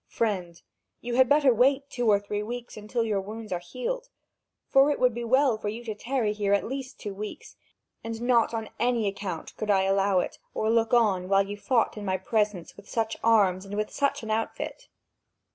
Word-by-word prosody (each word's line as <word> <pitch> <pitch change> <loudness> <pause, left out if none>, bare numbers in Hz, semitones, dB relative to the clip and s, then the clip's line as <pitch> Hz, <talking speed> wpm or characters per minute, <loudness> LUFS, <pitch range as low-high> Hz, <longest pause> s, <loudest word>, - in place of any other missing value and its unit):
"Friend, 185 -7 -2 0.4
you 240 0 -4
had 255 0 +4
better 285 -3 +5
wait 270 +4 +3
two 245 -3 0
or 205 -1 +5
three 205 0 -4
weeks 240 +3 -6
until 215 +3 -2
your 210 -3 0
wounds 215 +1 -8
are 180 - -1
healed, 255 - -5 0.6
for 270 +2 +5
it 290 - 0
would 250 -2 +3
be 240 +1 -4
well 255 -1 +3
for 210 - -3
you 230 +3 -6
to 225 -2 -4
tarry 230 0 -1
here 205 -1 0
at 200 - +3
least 265 +1 -6
two 205 - -5
weeks, 210 +2 -8 0.5
and 225 0 -5
not 240 -1 +3
on 225 -2 -4
any 235 -3 +1
account 195 -4 -5
could 215 - -4
I 195 -2 +4
allow 195 0 +2
it, - - -4 0.2
or 220 +1 +1
look 225 -1 +2
on, 200 -6 +3
while 195 0 +4
you 205 +1 -5
fought 230 +2 +1
in 210 - -5
my 190 -1 0
presence 205 -2 -1
with 205 0 -15
such 225 -1 -1
arms 200 -5 +4
and 200 +1 -6
with 215 0 -2
such 280 -4 0
an 220 - -4
outfit." 225 +1 -3
220 Hz, 210 wpm, -27 LUFS, 200-240 Hz, 0.6 s, better